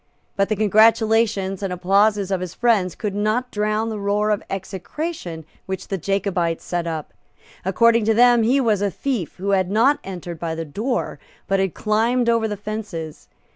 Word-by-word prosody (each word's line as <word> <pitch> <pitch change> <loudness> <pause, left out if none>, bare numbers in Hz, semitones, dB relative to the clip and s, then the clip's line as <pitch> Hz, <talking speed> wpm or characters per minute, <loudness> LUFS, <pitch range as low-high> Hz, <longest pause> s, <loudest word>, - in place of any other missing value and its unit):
But 195 0 +1
the 215 - +1
congratulations 215 -2 +3
and 195 -2 -2
applauses 195 +2 +2
of 190 -2 0
his 180 -1 -6
friends 215 -7 +2
could 210 -3 -3
not 215 +5 -1
drown 215 +1 0
the 215 -2 -4
roar 205 +1 +1
of 210 - 0
execration 190 - -5 0.2
which 190 -1 -5
the 195 - -1
Jacobites 180 -3 -1
set 175 -1 -2
up. 160 -2 -5 0.5
According 230 +4 +3
to 220 0 +3
them, 240 0 +6
he 245 +5 +3
was 220 -6 +1
a 205 - +1
thief 235 - -3
who 195 +2 -2
had 190 -2 +2
not 235 +8 +3
entered 175 -3 -7
by 165 -1 -3
the 165 0 -4
door, 225 - -3 0.3
but 195 0 +1
had 190 -2 -1
climbed 235 +3 +1
over 230 -1 +2
the 210 -1 -4
fences. 200 -7 -6
205 Hz, 175 wpm, -21 LUFS, 185-225 Hz, 0.5 s, them